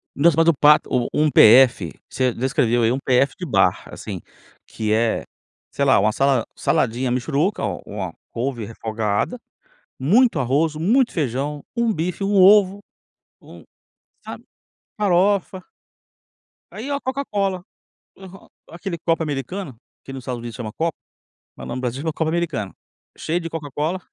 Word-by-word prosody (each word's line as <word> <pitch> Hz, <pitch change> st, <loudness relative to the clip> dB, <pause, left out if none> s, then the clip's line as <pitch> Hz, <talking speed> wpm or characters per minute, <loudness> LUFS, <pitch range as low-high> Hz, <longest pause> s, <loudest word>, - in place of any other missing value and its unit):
Nossa 160 Hz, +2 st, +4 dB
mas 165 Hz, 0 st, +4 dB
o 170 Hz, -, +6 dB
prato 150 Hz, +1 st, +4 dB
o 125 Hz, -2 st, +1 dB
um 155 Hz, 0 st, +2 dB
PF, 120 Hz, -, +6 dB, 0.2 s
você 130 Hz, -2 st, 0 dB
descreveu 120 Hz, -1 st, +1 dB
aí 115 Hz, -, +3 dB
um 130 Hz, -, 0 dB
PF 135 Hz, +1 st, +2 dB
de 180 Hz, -, -5 dB
bar, 150 Hz, -, +2 dB
assim, -, -, -7 dB, 0.4 s
que 110 Hz, -1 st, -4 dB
é, 115 Hz, +1 st, +1 dB, 0.5 s
sei 140 Hz, -, -1 dB
lá 135 Hz, -, +5 dB
uma 105 Hz, +2 st, +2 dB
sala 135 Hz, 0 st, +1 dB
saladinha 120 Hz, +2 st, 0 dB
mixuruca 145 Hz, -, -1 dB
o -, -, -2 dB
uma 95 Hz, -5 st, -5 dB, 0.2 s
couve 120 Hz, -2 st, -3 dB
refogada, 110 Hz, -, -3 dB, 0.6 s
muito 205 Hz, -, +3 dB
arroz, 140 Hz, +5 st, +1 dB
muito 230 Hz, -, +2 dB
feijão, 145 Hz, 0 st, -2 dB
um 235 Hz, -2 st, +1 dB
bife, 175 Hz, +2 st, -3 dB
um 200 Hz, +1 st, 0 dB
ovo, 200 Hz, 0 st, +6 dB, 0.6 s
um -, -, -14 dB, 0.6 s
sabe, -, -, -9 dB, 0.5 s
farofa 195 Hz, -1 st, +1 dB, 1.1 s
aí 230 Hz, +6 st, -7 dB
a 280 Hz, -, -1 dB
Coca-Cola, 200 Hz, -9 st, -2 dB, 0.5 s
aham, 190 Hz, 0 st, -13 dB, 0.2 s
aquele 175 Hz, +1 st, -6 dB
copo 165 Hz, 0 st, 0 dB
americano, 145 Hz, -, -5 dB, 0.2 s
que -, -, -10 dB
no 135 Hz, -, -6 dB
Estados 125 Hz, -1 st, -5 dB
Unidos 115 Hz, -2 st, -8 dB
chama 110 Hz, -2 st, -6 dB
copo, 165 Hz, -1 st, -2 dB, 0.6 s
mas -, -, -9 dB
no 130 Hz, -, -4 dB
Brasil 125 Hz, +1 st, -3 dB
chama 160 Hz, 0 st, -2 dB
copo 160 Hz, +1 st, -2 dB
americano, 160 Hz, -, -2 dB, 0.4 s
cheio 170 Hz, +3 st, -2 dB
de 165 Hz, -, -5 dB
Coca-Cola. 155 Hz, +2 st, -3 dB
150 Hz, 150 wpm, -21 LUFS, 125-180 Hz, 1.1 s, o